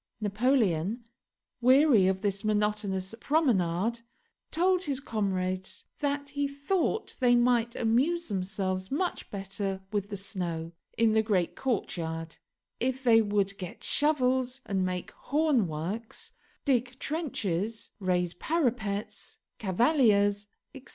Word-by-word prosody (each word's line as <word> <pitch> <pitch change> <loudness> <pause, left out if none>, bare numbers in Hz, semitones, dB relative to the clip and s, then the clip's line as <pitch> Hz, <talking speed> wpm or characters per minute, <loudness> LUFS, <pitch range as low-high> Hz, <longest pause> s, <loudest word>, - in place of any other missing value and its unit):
Napoleon, 215 - +1 0.6
weary 255 -5 +6
of 190 0 0
this 200 -2 -1
monotonous 210 -2 0
promenade, 230 - +1 0.5
told 365 +2 +2
his 275 -3 -1
comrades 190 -6 -2
that 285 -1 -1
he 285 0 -1
thought 315 +9 -1
they 245 -2 +5
might 240 -1 +2
amuse 275 +10 +1
themselves 190 -1 -2
much 350 +6 -2
better 195 -1 -4
with 205 -1 -2
the 200 - -4
snow, 175 -4 -3 0.3
in 225 -1 +4
the 220 - +4
great 195 -6 0
courtyard, 165 -9 -3 0.4
if 260 +1 -1
they 230 -3 +6
would 205 -2 0
get 180 -2 -7
shovels 260 -3 +2
and 190 -2 0
make 180 -1 -3
hornworks, 225 - -1 0.3
dig 255 -2 +1
trenches, 225 - -2
raise 180 -2 0
parapets, 220 - -2 0.2
cavaliers, 205 - +3 0.3
etc. 270 0 -12
220 Hz, 110 wpm, -29 LUFS, 190-260 Hz, 0.6 s, weary